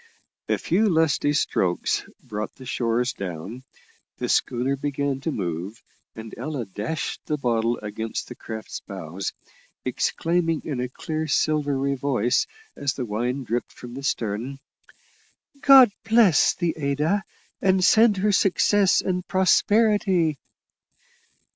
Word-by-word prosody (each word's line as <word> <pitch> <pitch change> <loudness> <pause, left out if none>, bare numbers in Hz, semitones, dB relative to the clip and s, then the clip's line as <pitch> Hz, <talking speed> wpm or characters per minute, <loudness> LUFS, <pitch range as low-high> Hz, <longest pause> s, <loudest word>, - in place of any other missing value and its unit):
A - - +2
few 210 +5 +1
lusty 160 -3 +2
strokes 95 -11 0 0.2
brought 110 -3 -5
the 130 - -12
shores 120 +1 0
down, 95 +6 -6 0.6
the - - -3
schooner 125 +3 +1
began 140 -1 -2
to 160 - -2
move, 90 - -4 0.4
and 110 0 -9
Ella 135 -2 -3
dashed 105 +10 -4
the 150 - 0
bottle 120 -3 0
against 110 +2 -4
the - - -7
craft's 110 -2 -7
bows, 95 -1 -6 0.5
exclaiming 165 -1 0
in 140 -5 -3
a 125 0 -2
clear, 155 +4 -4
silvery 145 -2 +1
voice, 125 -3 +1 0.3
as 140 -2 -2
the 130 - -3
wine 120 +5 -2
dripped 120 0 -3
from 120 -1 -10
the 135 - -6
stem: 120 0 -2 1.0
"God 265 -5 +8
bless 220 - +4
the 170 -2 -1
Ada, 150 +7 0 0.4
and 190 -1 +3
send 220 -1 +5
her 205 +2 +2
success 195 0 +3
and 180 -1 -2
prosperity!" 190 -4 +3
140 Hz, 125 wpm, -24 LUFS, 115-170 Hz, 1.0 s, God